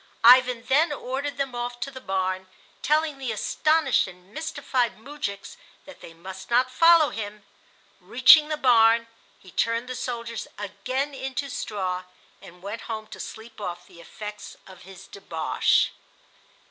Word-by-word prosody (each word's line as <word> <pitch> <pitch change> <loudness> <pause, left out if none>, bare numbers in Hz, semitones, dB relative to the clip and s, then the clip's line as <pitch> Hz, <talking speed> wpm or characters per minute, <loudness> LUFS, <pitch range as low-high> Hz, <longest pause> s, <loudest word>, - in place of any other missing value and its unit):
Ivan 250 0 +6
then 295 +6 +3
ordered 280 +1 -4
them 275 -2 -2
off 240 0 -4
to 275 +3 -3
the 260 -1 -10
barn, 190 -2 -2 0.3
telling 305 -1 +1
the 260 -4 -3
astonished 310 +8 +2
and 180 +1 -15
mystified 275 -6 -2
moujiks 225 - -6 0.3
that 285 - -14
they - - -11
must 185 +3 -10
not 250 +2 +3
follow 330 +2 +6
him. 210 -1 -7 0.5
Reaching 305 -2 +6
the 305 - -1
barn, 230 -3 +5 0.3
he 185 - -17
turned 230 +6 0
the 255 - -4
soldiers 230 -2 -5
again 255 +8 -3
into 270 +1 -4
straw 185 -5 -3 0.4
and 180 +1 -15
went 205 +3 -6
home 220 -1 -4
to - - -10
sleep 220 0 -9
off 175 -3 -5
the 170 - -16
effects 210 +4 -9
of 190 -2 -14
his 195 +1 -13
debauch. 165 -6 0
235 Hz, 145 wpm, -25 LUFS, 200-270 Hz, 0.5 s, Ivan